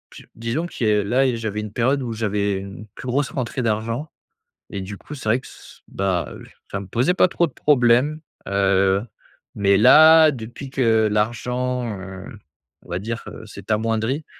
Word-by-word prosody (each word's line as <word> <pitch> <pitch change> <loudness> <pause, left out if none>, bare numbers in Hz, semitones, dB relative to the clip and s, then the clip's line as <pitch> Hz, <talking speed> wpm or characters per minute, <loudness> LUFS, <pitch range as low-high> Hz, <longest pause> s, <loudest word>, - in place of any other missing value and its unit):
je - - -11
disons 115 +10 -3
qui 120 - -4
a 105 -1 +3
là 125 +3 +2
j'avais 110 -2 -3
une 105 -1 -7
période 130 +3 +1
où 115 -2 -4
j'avais 105 -2 -1
une 100 +2 -9
plus 125 - -9
grosse 135 +3 0
rentrée 130 -1 -3
d'argent 115 +7 -2 0.6
et 100 - -4
du 100 +1 -7
coup 150 - -11
c'est 110 -5 -4
vrai 120 +4 +3
que - - -17
s - - -15
bah, 90 -9 -2 0.4
ça 100 - -2
me 100 - -9
posait 125 - +1
pas 185 - +4
trop 170 -1 +1
de 135 - -15
problème, 135 +2 +3 0.3
heu, 100 0 +2 0.5
mais 100 -1 +3
là 155 +7 +7
depuis 120 +2 -8
que 110 -5 +2
l'argent, 125 +3 -1
heu, 95 0 -9 0.6
on - - -19
va 90 +1 -2
dire, 115 +3 -5
heu, - - -9
c'est 100 0 -9
amoindri, 115 +6 0
115 Hz, 180 wpm, -22 LUFS, 100-130 Hz, 0.6 s, là